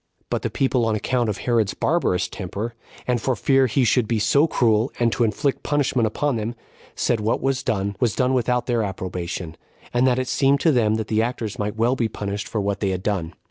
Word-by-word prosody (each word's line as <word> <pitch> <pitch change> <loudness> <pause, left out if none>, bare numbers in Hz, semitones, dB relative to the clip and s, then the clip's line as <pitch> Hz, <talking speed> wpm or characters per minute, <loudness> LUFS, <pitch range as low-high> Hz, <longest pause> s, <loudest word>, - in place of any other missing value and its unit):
4. - - -38
But - - 0
the - - -2
people, 130 -2 +1
on 110 - +1
account 120 +2 0
of 105 - -2
Herod's 115 -5 0
barbarous 95 - +1
temper, 100 +5 -5 0.3
and 125 -2 0
for 130 +1 0
fear 135 +3 +3
he 130 +3 +1
should 120 -1 +2
be 115 - 0
so 125 +9 +3
cruel 115 -3 +2
and 120 -1 +3
to 120 - +1
inflict 135 +5 0
punishment 130 -6 +1
on 145 -5 +2
them, 110 +2 -3 0.4
said 120 - +1
what 110 +2 0
was 135 0 0
done 100 -5 -1
was 115 -5 +1
done 130 0 +2
without 125 -1 +1
their 120 -2 +1
approbation, 90 -4 -4 0.4
and 120 +2 +3
that 125 -1 +2
it 130 0 -1
seemed 140 +2 +2
to 165 - +4
them 110 -5 +2
that 110 -1 -3
the 110 0 +1
actors 115 -3 -3
might 105 +1 -2
well 120 +3 +2
be 120 -3 0
punished 100 -1 -4
for 110 - -2
what 100 0 -1
they 100 - 0
had 95 -1 -3
done. 90 -6 -2
115 Hz, 225 wpm, -23 LUFS, 105-125 Hz, 0.4 s, to